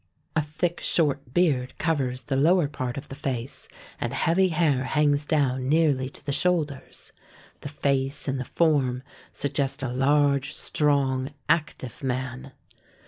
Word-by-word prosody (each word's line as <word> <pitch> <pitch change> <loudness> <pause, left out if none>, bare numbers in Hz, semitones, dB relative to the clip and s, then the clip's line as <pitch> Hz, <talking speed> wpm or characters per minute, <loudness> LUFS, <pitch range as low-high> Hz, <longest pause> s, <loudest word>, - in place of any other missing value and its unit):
A 160 - +3
thick 165 +4 -2
short 140 -6 +1
beard 135 -6 +1
covers 135 -6 -1
the 135 +3 -2
lower 165 +4 +4
part 130 -3 -4
of 140 - -7
the - - -7
face, 130 -3 -4 0.3
and 120 +1 -2
heavy 175 +6 +3
hair 155 -6 +1
hangs 150 +1 +1
down 130 -4 +1
nearly 145 -4 +2
to - - -14
the 145 - -1
shoulders. 155 -4 -1 0.5
The 145 - -7
face 140 -1 -1
and 135 -1 -1
the - - -2
form 130 -4 +1 0.3
suggest 140 -1 -1
a 130 - -1
large, 140 +1 +2
strong, 140 -2 0
active 145 -7 -1
man. 130 +1 -3
140 Hz, 140 wpm, -26 LUFS, 130-150 Hz, 0.5 s, lower